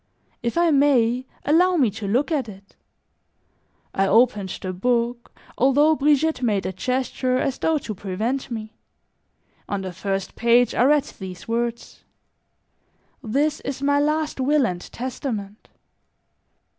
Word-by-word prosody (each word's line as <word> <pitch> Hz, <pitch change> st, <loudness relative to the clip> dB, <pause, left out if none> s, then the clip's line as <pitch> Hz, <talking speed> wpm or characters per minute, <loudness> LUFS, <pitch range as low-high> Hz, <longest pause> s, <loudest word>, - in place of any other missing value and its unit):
"If 235 Hz, +6 st, -2 dB
I 340 Hz, -1 st, +4 dB
may, 260 Hz, -3 st, +3 dB, 0.2 s
allow 355 Hz, +5 st, +4 dB
me 260 Hz, -10 st, +3 dB
to 210 Hz, 0 st, -6 dB
look 255 Hz, +10 st, +1 dB
at 275 Hz, -7 st, -1 dB
it." 195 Hz, 0 st, -14 dB, 1.2 s
I 195 Hz, 0 st, +1 dB
opened 210 Hz, -2 st, +3 dB
the 185 Hz, -1 st, -4 dB
book, 235 Hz, +4 st, -1 dB, 0.3 s
although 285 Hz, +5 st, +4 dB
Brigitte 300 Hz, 0 st, +2 dB
made 210 Hz, -5 st, 0 dB
a 190 Hz, -, -3 dB
gesture 255 Hz, +4 st, -1 dB
as 265 Hz, 0 st, -1 dB
though 320 Hz, -1 st, +2 dB
to 230 Hz, -6 st, -5 dB
prevent 215 Hz, +8 st, -3 dB
me; 220 Hz, -2 st, -6 dB, 1.0 s
on 200 Hz, -1 st, -2 dB
the 185 Hz, -1 st, -5 dB
first 195 Hz, +1 st, -3 dB
page 235 Hz, +1 st, +3 dB
I 245 Hz, -, +3 dB
read 295 Hz, 0 st, +4 dB
these 185 Hz, -2 st, -10 dB
words: 235 Hz, 0 st, -3 dB, 1.2 s
"This 285 Hz, +6 st, 0 dB
is 275 Hz, 0 st, -5 dB
my 285 Hz, 0 st, +3 dB
last 305 Hz, 0 st, 0 dB
will 280 Hz, +1 st, +3 dB
and 175 Hz, -5 st, -3 dB
testament." 230 Hz, -5 st, -5 dB
245 Hz, 135 wpm, -23 LUFS, 210-285 Hz, 1.2 s, I